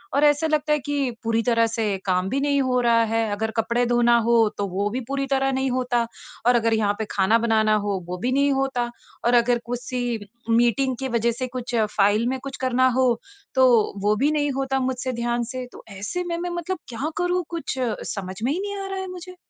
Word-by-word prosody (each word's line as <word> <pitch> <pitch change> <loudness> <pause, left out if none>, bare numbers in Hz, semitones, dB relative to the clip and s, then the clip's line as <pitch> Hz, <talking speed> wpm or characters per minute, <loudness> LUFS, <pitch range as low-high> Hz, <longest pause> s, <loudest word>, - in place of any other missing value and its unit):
और 285 - +3
ऐसा 295 +2 +3
लगता 300 -1 +1
है 300 - +2
कि 280 -2 -1
पूरी 230 0 +1
तरह 230 -2 +3
से 220 -3 -1
काम 185 0 +1
भी 275 - 0
नहीं 280 -1 +2
हो 255 -1 +1
रहा 230 -1 +4
है। 225 +1 0
अगर 220 +2 -2
कपड़े 235 +2 +1
धोना 240 0 +4
हो 235 0 +4 0.2
तो 200 -1 -1
वो 200 +3 -1
भी 250 +4 -3
पूरी 275 0 -1
तरह 270 0 +2
नहीं 265 0 0
होता 245 -2 0 0.4
और 245 - +6
अगर 230 -1 +2
यहाँ 210 -2 +2
पे 220 - -1
खाना 200 +3 +3
बनाना 220 -2 +3
हो 200 -2 -1
वो 180 0 -4
भी 250 +6 -1
नहीं 280 +1 +3
होता 270 -3 0 0.4
और 240 - +3
अगर 240 0 +3
किसी 245 -1 -3 0.3
मीटिंग 240 +3 +3
की 265 - -2
वजह 235 0 +1
से 255 +2 -4
कुछ 245 0 -4 0.2
फ़ाइल 210 +3 +3
में 265 - -2
कुछ 275 -1 -6
करना 255 0 +3
हो 260 -1 +4 0.5
तो 260 0 +6 0.4
वो 210 +1 +3
भी 290 +5 +2
नहीं 290 -2 +1
होता 270 0 -1
मुझसे 255 0 -2
ध्यान 235 0 -1
से। 255 -1 -4
तो - - -13
ऐसे 350 - -3
में 340 -1 -3
मैं 355 +1 -3
मतलब 345 +2 -3
क्या 265 +6 -3
करूँ 355 0 +1
कुछ 335 -5 -4 0.4
समझ 190 -2 -5
में 260 - +1
ही 355 - -2
नहीं 405 0 -4
आ 390 - -5
रहा 385 0 -4
है 380 - -4
मुझे। 365 0 -9
245 Hz, 225 wpm, -23 LUFS, 230-275 Hz, 0.5 s, और